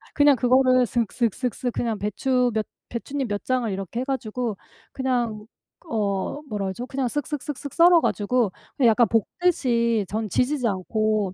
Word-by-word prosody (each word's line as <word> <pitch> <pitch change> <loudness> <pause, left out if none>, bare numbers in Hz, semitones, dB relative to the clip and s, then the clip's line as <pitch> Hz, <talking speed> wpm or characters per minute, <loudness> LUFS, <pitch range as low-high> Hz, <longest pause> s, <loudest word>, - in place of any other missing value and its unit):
그냥 290 -1 +6
그거를 255 +1 +4
쓱 235 -3 0
쓱 235 -3 +1
쓱 255 -1 -1
쓱 245 +3 -4
그냥 230 -3 -1
배추 250 +4 +1
몇 220 -1 0 0.2
배춧잎 270 +3 -3
몇 205 -1 -3
장을 255 -3 0
이렇게 195 +4 -4
해 - - -1
가지고 250 -4 -2 0.4
그냥 240 -5 -1 0.4
어 210 +1 -2
뭐라 205 -3 -2
그러죠? 190 +6 -4
그냥 265 -1 -2
쓱 290 +4 -2
쓱 295 - -3
쓱 295 -2 -4
쓱 280 +1 -8
썰어 345 0 +6
가지고 220 -2 +1 0.3
그 260 - +3
약간 230 +1 +5
볶듯이 235 - +1
저는 215 +2 -3
지지지 250 - +1
않고 215 0 0
240 Hz, 310 characters per minute, -24 LUFS, 215-260 Hz, 0.4 s, 그냥